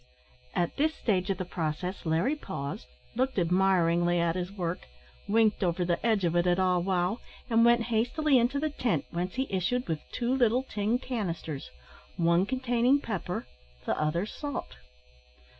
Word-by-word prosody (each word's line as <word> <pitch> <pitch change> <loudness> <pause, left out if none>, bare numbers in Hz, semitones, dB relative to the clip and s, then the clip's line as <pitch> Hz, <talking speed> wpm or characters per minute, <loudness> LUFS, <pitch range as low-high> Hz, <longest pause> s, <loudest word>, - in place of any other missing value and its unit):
At 175 - 0
this 310 +2 +1
stage 190 -4 0
of 195 - 0
the 185 - -3
process 175 +1 -3
Larry 165 - +2
paused, 140 - -6 0.3
looked 260 +1 0
admiringly 175 -1 +3
at 170 0 +1
his 180 0 -3
work, 180 -3 -4 0.4
winked 215 -1 +3
over 175 0 +1
the 175 -1 -1
edge 220 -5 +2
of 170 0 0
it 175 +1 +3
at 175 0 +3
Ah 185 -1 +3
wow, 180 +4 0 0.3
and 230 0 +5
went 235 0 +5
hastily 255 +5 +3
into 245 +4 +1
the 310 +1 -1
tent, 235 - -1
whence 180 +3 -3
he 265 +1 0
issued 195 +7 0
with 160 -3 -1
two 245 +1 -1
little 250 -1 +3
tin 215 -1 0
canisters, 175 - -4 0.5
one 170 +2 +3
containing 255 +1 +2
pepper, 195 -8 -4 0.4
the - - 0
other 160 +5 0
salt. 285 +5 -5
190 Hz, 160 wpm, -29 LUFS, 175-240 Hz, 0.5 s, and